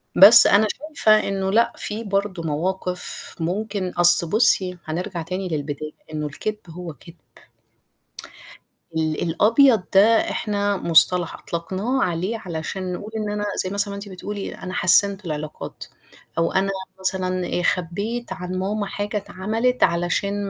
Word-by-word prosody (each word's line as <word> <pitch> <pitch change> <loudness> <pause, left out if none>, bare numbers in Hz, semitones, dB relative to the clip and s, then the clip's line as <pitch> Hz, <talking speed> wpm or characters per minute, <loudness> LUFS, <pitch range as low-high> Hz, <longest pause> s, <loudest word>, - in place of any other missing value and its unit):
بس 200 +5 +9
أنا 215 +2 +4 0.3
شايفة 215 -7 +3
إنه 195 -1 -2
لأ، 230 +3 +2
في 215 +2 -5
برضه 195 -3 -3
مواقف 180 +4 -3
ممكن 195 +2 -3
أصل 175 -1 +8
بُصّي 190 -4 +3
هنرجع 175 +2 -5
تاني 185 +3 -5
للبداية، 150 0 -5 0.2
إنه 150 0 -3
الكدب 210 +8 -5
هو 170 0 -8
كدب. 165 +5 -16 1.8
ال 155 -1 -2
الأبيض 220 - +3
ده 220 +3 +4
إحنا 205 -2 -2
مصطلح 170 +1 +3
أطلقناه 190 +10 -3
عليه 180 +6 -2
علشان 180 +2 -5
نقول 205 +4 -8
إن 215 -1 -3
أنا 205 0 -3 0.2
زي 185 - -4
مثلًا 200 0 0
أنتِ 200 0 -9
بتقولي 195 +2 -7
أنا 185 0 -8
حسنت 195 +2 +3
العلاقات، 155 -1 -7 0.5
أو 165 - 0
أنا 195 +1 0 0.3
مثلًا 185 -1 -2
خبيت 200 +9 -3
عن 180 0 -6
ماما 205 +2 -2
حاجة 205 +2 -4
اتعملت 215 +5 -2
علشان 190 +4 -1
190 Hz, 130 wpm, -21 LUFS, 175-205 Hz, 1.8 s, بس